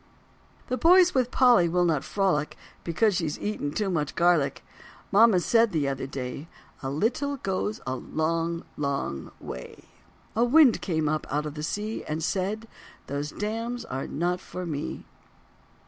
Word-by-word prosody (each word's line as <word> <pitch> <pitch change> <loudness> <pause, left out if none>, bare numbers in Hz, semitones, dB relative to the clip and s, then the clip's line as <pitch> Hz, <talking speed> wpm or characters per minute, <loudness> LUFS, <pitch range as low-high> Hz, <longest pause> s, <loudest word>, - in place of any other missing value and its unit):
The 255 - -2
boys 360 +4 +6
with 255 -2 +2
Polly 245 -10 +5
will 175 +1 +2
not 155 -5 +1
frolic 185 -7 0 0.3
Because 205 +6 +2
she's 160 -4 -2
eaten 205 -9 -3
too 200 +3 -1
much 150 -4 -1
garlic. 170 -5 +2 0.5
Mama 210 -2 +6
said 230 +4 +3
the 155 -5 0
other 135 -1 -3
day, 135 +3 -5 0.3
"A 135 - -3
little 245 - 0
goes 205 0 -2
a 130 - -2
long, 165 +4 -2
long 140 - -2
way." 65 - -9 0.5
A 230 - +3
wind 260 0 +5
came 160 -5 0
up 155 +1 -1
out 150 +1 0
of 150 - -5
the 150 - -6
sea 210 +7 -3
And 155 +1 -3
said, 205 +5 -2 0.4
"Those 140 +2 -3
dams 230 +6 -4
are 135 +1 -4
not 175 +3 -1
for 180 0 -7
me." 150 -4 -4
175 Hz, 155 wpm, -27 LUFS, 150-220 Hz, 0.5 s, boys